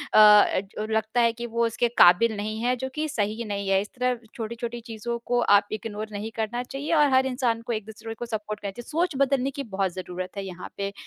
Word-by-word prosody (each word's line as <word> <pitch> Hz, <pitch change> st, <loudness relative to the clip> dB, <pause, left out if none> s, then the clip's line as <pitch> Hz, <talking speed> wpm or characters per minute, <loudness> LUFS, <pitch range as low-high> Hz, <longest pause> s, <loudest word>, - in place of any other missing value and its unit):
जो 210 Hz, -1 st, +5 dB
लगता 220 Hz, +2 st, +1 dB
है 230 Hz, 0 st, +4 dB
कि 235 Hz, +1 st, -6 dB
वो 235 Hz, 0 st, 0 dB
उसके 230 Hz, +1 st, +1 dB
काबिल 210 Hz, +6 st, +6 dB
नहीं 215 Hz, +1 st, -3 dB
है, 250 Hz, +1 st, +2 dB
जो 260 Hz, +2 st, -4 dB
कि 310 Hz, 0 st, -1 dB
सही 215 Hz, -3 st, -1 dB
नहीं 200 Hz, -2 st, -3 dB
है। 195 Hz, 0 st, +4 dB
इस 205 Hz, -, -7 dB
तरह 250 Hz, -1 st, +1 dB, 0.2 s
छोटी-छोटी 235 Hz, +1 st, -5 dB
चीज़ों 230 Hz, +1 st, -5 dB
को 245 Hz, 0 st, +1 dB, 0.2 s
आप 200 Hz, -, -1 dB
इग्नोर 215 Hz, 0 st, -5 dB
नहीं 210 Hz, +2 st, -5 dB
करना 225 Hz, +2 st, -2 dB
चाहिए 280 Hz, +6 st, -4 dB
और 295 Hz, -3 st, +5 dB
हर 260 Hz, 0 st, +5 dB
इंसान 250 Hz, -3 st, 0 dB
को 235 Hz, 0 st, -3 dB
एक-दूसरे 220 Hz, +1 st, -6 dB
को 240 Hz, -, -5 dB
सपोर्ट 215 Hz, -2 st, -4 dB
करना 200 Hz, -, -4 dB
चाहिए, 240 Hz, +4 st, -10 dB
सोच 330 Hz, 0 st, 0 dB
बदलने 275 Hz, 0 st, 0 dB
की 280 Hz, +1 st, -5 dB
बहुत 190 Hz, -2 st, 0 dB
ज़रूरत 185 Hz, +1 st, -6 dB
है 195 Hz, -, -3 dB
यहाँ 180 Hz, -1 st, -8 dB
पे 200 Hz, 0 st, -3 dB
225 Hz, 220 wpm, -25 LUFS, 205-245 Hz, 0.2 s, काबिल